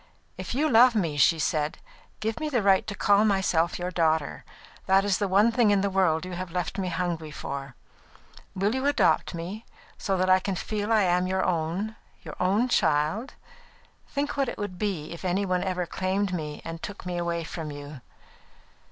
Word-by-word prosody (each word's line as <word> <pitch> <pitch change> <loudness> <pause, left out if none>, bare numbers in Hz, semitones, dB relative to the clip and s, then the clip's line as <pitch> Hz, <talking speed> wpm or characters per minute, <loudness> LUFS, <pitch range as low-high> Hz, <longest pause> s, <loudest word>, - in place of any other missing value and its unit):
"If - - -5
you 300 +4 +2
love 245 -2 +6
me," 170 -8 0
she 155 +4 +4
said, 155 -1 -1 0.4
"give 220 +1 -2
me 310 - -2
the 245 -7 0
right 195 -1 +4
to 200 - -4
call 200 +1 +4
myself 190 -5 +1
your 180 +1 -3
daughter. 160 -4 0 0.4
That 195 +1 +4
is 200 -2 +1
the 205 - +1
one 200 +5 +4
thing 230 -2 +3
in 200 -1 +3
the 200 0 0
world 180 -3 +2
you 185 - -7
have 180 0 -5
left 180 +3 -3
me 190 - -1
hungry 170 -2 -2
for. 140 -3 -6 0.8
Will 200 +3 +1
you 265 +2 0
adopt 285 -9 +2
me, 185 +7 -6 0.4
so 195 -2 0
that 185 +1 +1
I 185 0 +6
can 190 0 -3
feel 210 +3 -3
I 215 -2 +4
am 180 0 +2
your 190 0 0
own, 180 +6 -1 0.4
own 200 +7 +2
child? 160 - +1 0.7
Think 285 +1 -2
what 275 -3 0
it - - -6
would 205 -4 -5
be 185 -8 -2
if 170 - -8
any 190 +2 0
one 180 -1 0
ever 180 -2 -1
claimed 190 +2 -1
me 150 -4 -5
and 165 0 -6
took 205 -2 -7
me 175 -1 -3
away 170 -1 -2
from 160 -1 -6
you!" 145 -2 -9
185 Hz, 195 wpm, -26 LUFS, 170-205 Hz, 0.8 s, love